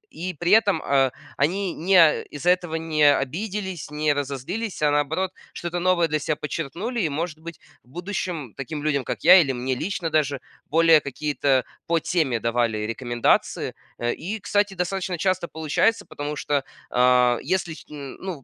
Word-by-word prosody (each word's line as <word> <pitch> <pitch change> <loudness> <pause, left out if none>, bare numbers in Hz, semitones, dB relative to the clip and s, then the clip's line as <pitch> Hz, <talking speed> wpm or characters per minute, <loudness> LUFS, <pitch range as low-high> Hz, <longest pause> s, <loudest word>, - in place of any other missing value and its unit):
и 180 0 -4
при 175 +1 0
этом, 205 -6 +5
а, 135 -2 +3 0.3
они 180 +6 0
не, 185 +4 +1
а, 160 -2 +5
из-за 150 +5 0
этого 175 -3 -1
не 160 -2 0
обиделись, 190 +4 -4
не 150 0 +1
разозлились, 145 - -4
а 150 - +4
наоборот, 160 +6 0 0.2
что-то 175 0 -4
новое 175 -1 +3
для 155 -1 0
себя 150 +1 -1
почерпнули. 170 - -4
И 160 - +1
может 155 +2 -3
быть 165 -1 -9 0.2
в - - -30
будущем 175 - -4
таким 145 +2 -5
людям 140 -3 +1
как - - -4
я 180 +2 +9
или 135 -4 0
мне 125 +1 -2
лично 165 +3 -3
даже 145 -3 +1 0.3
более 165 0 +5
какие-то 140 -2 0 0.2
по 170 0 +2
теме 150 -9 0
давали 115 -1 0
рекомендации. 120 +1 0 0.2
Э, 120 0 -1
и, 205 +7 -5
кстати, 205 0 0
достаточно 180 0 -2
часто 185 0 0
получается, 160 +8 0
потому 145 +1 -5
что 145 -1 -1 0.3
о 125 -1 +4
если 185 -3 -1
их 160 - -8
ну 150 +2 -7
160 Hz, 165 wpm, -24 LUFS, 140-180 Hz, 0.3 s, я